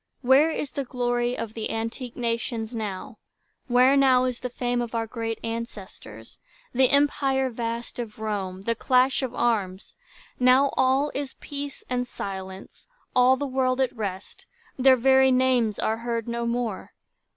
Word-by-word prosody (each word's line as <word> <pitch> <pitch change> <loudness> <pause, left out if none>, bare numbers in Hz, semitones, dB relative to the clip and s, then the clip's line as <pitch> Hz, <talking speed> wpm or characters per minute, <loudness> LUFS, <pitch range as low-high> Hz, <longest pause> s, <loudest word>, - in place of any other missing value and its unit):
Where 270 +5 +5
is 295 -4 -3
the 280 - -3
glory 245 -1 -1
of 225 -1 -5
the 220 -1 -4
antique 230 +2 -4
nations 230 -1 -2
now? 210 -5 -5 0.5
Where 255 +2 +5
now 260 -2 +4
the 250 +1 -6
fame 245 0 -1
of 235 -1 -5
our 225 0 0
great 225 0 -4
ancestors? 200 - -8 0.3
The 260 +1 +4
empire 275 -2 +2
vast 230 +1 -5
of 225 -3 -6
Rome, 200 -4 -4
the 230 +4 0
clash 255 +3 +2
of 255 -2 -4
arms? 195 -5 -1 0.5
Now 255 +2 +5
all 265 +3 +2
is 275 -1 -4
peace 285 -1 -7
and 250 0 -2
silence, 190 -3 -8 0.3
all 255 +1 +5
the 285 - -3
world 260 -1 0
At 260 -2 0
rest; 200 -3 -6 0.3
their 260 0 +5
very 265 +1 +5
names 255 -4 +2
are 220 - 0
heard 230 -1 -3
no 235 0 -2
more. 235 -4 -3
245 Hz, 150 wpm, -25 LUFS, 225-260 Hz, 0.5 s, Where